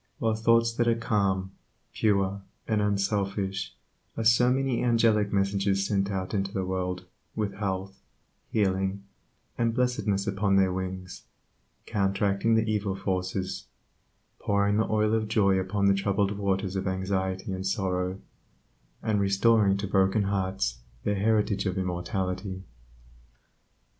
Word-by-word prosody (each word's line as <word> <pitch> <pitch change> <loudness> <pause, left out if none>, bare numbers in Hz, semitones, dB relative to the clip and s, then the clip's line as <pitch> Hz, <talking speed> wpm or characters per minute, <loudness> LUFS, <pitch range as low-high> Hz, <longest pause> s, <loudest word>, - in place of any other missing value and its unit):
While 110 -1 +1
thoughts 115 +1 +3
that 120 0 0
are 115 - +4
calm, 100 -4 0 0.4
pure, 100 -2 +1 0.3
and 110 -2 +1
unselfish 100 -1 -1 0.4
are 115 - -1
so 115 +2 +5
many 130 -2 0
angelic 115 -4 +3
messengers 100 0 +1
sent 100 -1 0
out 95 -1 -3
into 100 -1 -1
the 95 -3 -2
world 90 -1 -3 0.3
with 105 -2 -2
health, 95 -1 -4 0.5
healing, 95 -1 0 0.6
and 115 -1 +1
blessedness 120 -6 0
upon 100 0 +1
their 95 -1 +3
wings, 95 -1 -5 0.6
counteracting 100 +2 +1
the 110 0 +2
evil 105 -3 -1
forces; 95 0 -3 0.7
pouring 100 0 +1
the 110 - +1
oil 110 0 +2
of 110 -1 +1
joy 100 -3 +3
upon 100 +2 -1
the 100 - +5
troubled 100 0 +1
waters 95 -1 -1
of 95 - -2
anxiety 95 0 -2
and 95 0 -3
sorrow, 95 -2 -1 0.8
and 110 -2 +1
restoring 100 0 +3
to 100 +1 -3
broken 95 +2 +2
hearts 95 -10 -1 0.2
their 105 - +1
heritage 105 -1 +1
of 95 0 -2
immortality. 95 +1 -3
100 Hz, 130 wpm, -27 LUFS, 95-105 Hz, 0.8 s, so